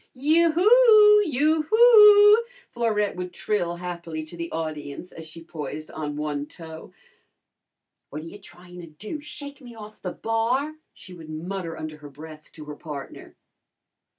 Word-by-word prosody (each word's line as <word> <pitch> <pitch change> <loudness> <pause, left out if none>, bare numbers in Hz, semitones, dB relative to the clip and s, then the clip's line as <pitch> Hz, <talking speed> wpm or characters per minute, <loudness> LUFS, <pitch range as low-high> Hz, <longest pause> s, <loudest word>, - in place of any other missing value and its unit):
"Yoo 315 +6 +2
hoo! 425 +2 +6
Yoo 310 +3 +1
hoo!" 430 -1 +7 0.3
Florette 215 -3 -1
would 180 0 -6
trill 175 -2 -2
happily 170 -2 -6
to 155 +2 -12
the 170 0 -6
audience 155 +1 -6
as 160 -1 -11
she 165 +1 -12
poised 155 -1 -8
on 150 -2 -5
one 150 -1 -4
toe. 160 -1 -12 1.2
"What 150 +2 -7
ta - - -10
you 185 +5 -11
tryin' 180 -1 -14
to 170 - -11
do 205 - -8
shake 285 -1 -10
me 240 -2 -13
off'n 215 -1 -12
the - - -5
bar?" 240 +7 -1 0.2
she 185 - -14
would 165 -3 -12
mutter 165 +1 -6
under 155 0 -7
her 150 -1 -12
breath 155 +2 -13
to 155 - -11
her 150 0 -8
partner. 145 -3 -10
180 Hz, 155 wpm, -24 LUFS, -, 1.2 s, hoo